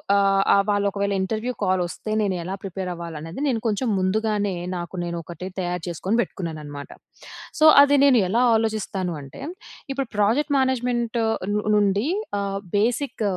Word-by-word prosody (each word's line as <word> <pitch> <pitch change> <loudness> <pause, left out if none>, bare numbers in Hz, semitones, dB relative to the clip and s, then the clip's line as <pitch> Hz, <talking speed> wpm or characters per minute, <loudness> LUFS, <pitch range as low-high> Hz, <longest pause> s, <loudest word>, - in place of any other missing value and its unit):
ఆహ్, 195 0 +4
వాళ్ళు 205 0 +2
ఒకవేళ 200 0 -1
ఇంటర్వ్యూ 220 +6 -2
కాలొస్తే, 185 +3 -1
నేను 195 -3 0
ఎలా 190 +3 -4
ప్రిపేర్ 190 -1 -4
అవ్వాలనేది 165 - -7
నేను 245 -5 +1
కొంచెం 220 +4 0
ముందుగానే 205 +1 0 0.2
నాకు 175 +1 -5
నేను 170 0 -3
ఒకటి 175 +2 -8
తయారు 180 -1 -2
చేసుకొని 185 +6 -1
పెట్టుకున్నానన్నమాట. 150 -8 -6 0.7
సో, 310 - +5 0.2
అది 285 0 +5
నేను 260 -5 +6
ఎలా 230 +6 +2
ఆలోచిస్తాను 210 -5 -1
అంటే, 135 - -11 0.5
ఇప్పుడు 270 -2 -2
ప్రాజెక్ట్ 265 +9 +2
మేనేజ్మెంట్ 245 -3 0 0.4
ను 210 - 0
నుండి 205 +2 +2 0.3
ఆహ్, 195 0 -2 0.2
బేసిక్ 235 +2 0
200 Hz, 140 wpm, -23 LUFS, 180-225 Hz, 0.7 s, నేను